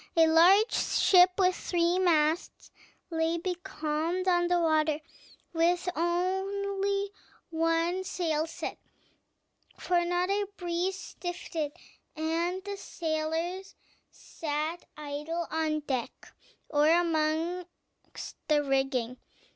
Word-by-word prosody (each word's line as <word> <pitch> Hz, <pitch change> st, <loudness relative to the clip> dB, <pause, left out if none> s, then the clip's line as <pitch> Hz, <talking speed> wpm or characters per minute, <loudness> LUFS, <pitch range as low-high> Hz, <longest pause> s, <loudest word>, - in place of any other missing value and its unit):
A 325 Hz, -, +7 dB
large 355 Hz, +7 st, +6 dB
ship, 360 Hz, -1 st, +5 dB
with 370 Hz, -2 st, +3 dB
three 345 Hz, +1 st, +1 dB
masts, 320 Hz, -2 st, +1 dB, 0.4 s
lay 325 Hz, +1 st, +1 dB
becalmed 350 Hz, -1 st, -2 dB
on 350 Hz, -1 st, +3 dB
the 350 Hz, 0 st, +2 dB
water, 310 Hz, -2 st, +2 dB, 0.5 s
with 345 Hz, +2 st, +2 dB
only 390 Hz, +3 st, -1 dB, 0.4 s
one 330 Hz, +3 st, +1 dB
sail 320 Hz, -4 st, -1 dB
set; 330 Hz, -, -6 dB, 1.0 s
for 350 Hz, -1 st, +1 dB
not 355 Hz, +2 st, 0 dB
a 405 Hz, 0 st, 0 dB
breeze 355 Hz, +2 st, -1 dB
stiffed, 350 Hz, -2 st, -7 dB, 0.6 s
and 335 Hz, +4 st, -1 dB
the 400 Hz, 0 st, -5 dB
sailors 330 Hz, +2 st, -3 dB, 0.3 s
sat 310 Hz, +2 st, -4 dB
idle 300 Hz, +3 st, -4 dB
on 310 Hz, -1 st, 0 dB
deck 260 Hz, -5 st, -4 dB, 0.3 s
or 295 Hz, 0 st, +3 dB
amongst 335 Hz, +1 st, -2 dB
the 295 Hz, -1 st, +3 dB
rigging. 270 Hz, -3 st, 0 dB
340 Hz, 100 wpm, -29 LUFS, 315-360 Hz, 1.0 s, A